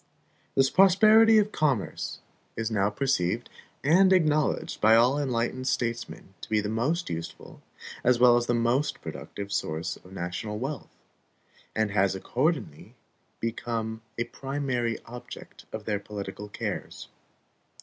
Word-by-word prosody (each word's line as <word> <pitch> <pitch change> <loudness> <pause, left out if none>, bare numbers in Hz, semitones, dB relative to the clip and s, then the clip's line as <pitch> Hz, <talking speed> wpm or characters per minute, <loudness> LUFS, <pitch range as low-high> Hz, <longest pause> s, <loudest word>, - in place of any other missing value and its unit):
The 135 0 +5
prosperity 215 +4 +6
of 210 0 +3
commerce 140 - -1 0.4
is 115 0 -2
now 100 -2 +2
perceived 105 -7 -1 0.3
and 185 +6 +5
acknowledged 155 -5 +1
by 110 +1 +6
all 125 +5 +4
enlightened 130 -1 -1
statesmen 115 -6 -3
to - - -9
be 110 - +2
the 105 0 -2
most 135 - -1
useful 85 0 -7 0.4
as 125 0 +4
well 120 -1 +7
as 120 0 +1
the 120 - +2
most 120 +5 +1
productive 100 0 -7
source 80 -2 -2
of 90 - -17
national 95 +4 -4
wealth, 135 +6 -5 0.9
and 110 -1 +1
has 95 -1 +2
accordingly 120 - -2 0.4
become 115 -1 -3 0.2
a 120 - +1
primary 130 -2 -2
object 120 +1 -11
of 110 -1 -6
their 105 -2 -1
political 100 0 -7
cares. - - -5
120 Hz, 130 wpm, -27 LUFS, 105-140 Hz, 0.9 s, well